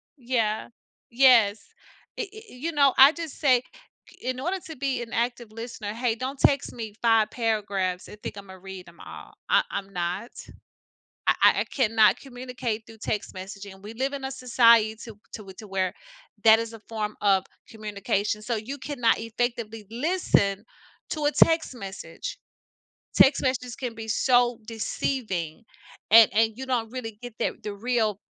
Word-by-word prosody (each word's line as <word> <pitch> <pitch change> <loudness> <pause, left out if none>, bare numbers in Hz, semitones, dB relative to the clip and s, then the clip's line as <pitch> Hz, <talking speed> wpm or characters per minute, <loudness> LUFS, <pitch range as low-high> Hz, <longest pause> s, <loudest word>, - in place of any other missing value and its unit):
Yeah, 235 -5 -1 0.4
yes. 235 -5 +5 0.6
I - - +1
i - - -4
i - - -17 0.2
you 300 +7 -4
know, 280 -3 +4
I 270 +2 +9
just 330 -2 -7
say, 255 -5 +4 0.6
in 255 0 -2
order 355 +7 -1
to 320 - -8
be 265 -2 -2
an 230 - -11
active 240 -1 -2
listener, 225 -1 -6
"Hey, 235 0 0
don't 260 +3 -5
text 280 0 +2
me 220 -3 -6
5 225 -2 +4
paragraphs 200 -6 -1
and 210 - -11
think - - -6
Imma 190 -1 -10
read 190 -1 -9
'em 170 - -16
all. - - -11 0.2
I - - +5
I'm 195 -1 -4
not, 180 +6 -3 1.0
I - - +5
I - - +6
I - - 0
cannot 225 -4 +3
communicate 245 -4 -5
through 225 -1 -14
text 210 -2 -3
messaging, 195 +1 -8
and 190 - -18
we 220 - -8
live 265 +4 -1
in 275 -1 -5
a - - -1
society 235 -4 +4 0.4
to 195 -3 -8
to 215 - -9
where 190 -1 -1 0.5
that 220 0 +8
is 230 0 -4
a 225 - -10
form 215 -2 -3
of 195 -2 +3 0.2
communication, 210 -1 -2
so 230 +1 -2
you 245 +7 -5
cannot 260 -4 +1
effectively 230 -1 -3
listen 235 - +1 0.5
to 305 -2 -3
a 295 - +2
text 325 -4 +3
message." 235 - -7 0.8
Text 275 +1 +6
messages 255 -2 -1
can 245 -3 -5
be 225 0 -7
so 245 +1 +3
deceiving, 220 - -3 0.5
and 225 0 +9
and 220 +1 +3
you 265 +3 -6
don't 235 -4 -1
really 225 -4 -6
get 245 -2 -8
that - - -2
the 210 - -4
real 220 -2 0
230 Hz, 165 wpm, -26 LUFS, 210-255 Hz, 1.0 s, I